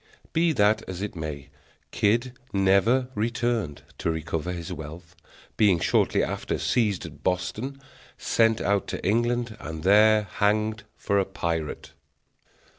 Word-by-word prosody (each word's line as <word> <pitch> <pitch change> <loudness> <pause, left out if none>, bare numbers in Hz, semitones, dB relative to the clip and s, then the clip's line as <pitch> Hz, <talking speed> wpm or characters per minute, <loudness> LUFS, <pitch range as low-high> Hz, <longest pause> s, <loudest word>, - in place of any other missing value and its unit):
Be 165 +1 +3
that 105 -3 +3
as 95 +1 -4
it 105 -1 -5
may, 75 -3 -6 0.4
Kidd 120 +4 +1 0.2
never 100 +7 +3
returned 115 - -1 0.2
to - - -1
recover 80 +1 -2
his 85 -2 -5
wealth; 80 +3 -9 0.4
being 100 -5 +5
shortly - - +2
after - - -2
seized 105 -8 0
at 75 -2 -11
Boston, 95 - -2 0.4
sent 115 -1 +2
out 100 0 +1
to - - -5
England, 120 +2 +1
and 80 0 -7
there 105 +2 +6
hanged 105 +3 0
for 100 -1 +1
a 95 - +1
pirate. 85 -5 -3
100 Hz, 130 wpm, -26 LUFS, 85-115 Hz, 0.4 s, there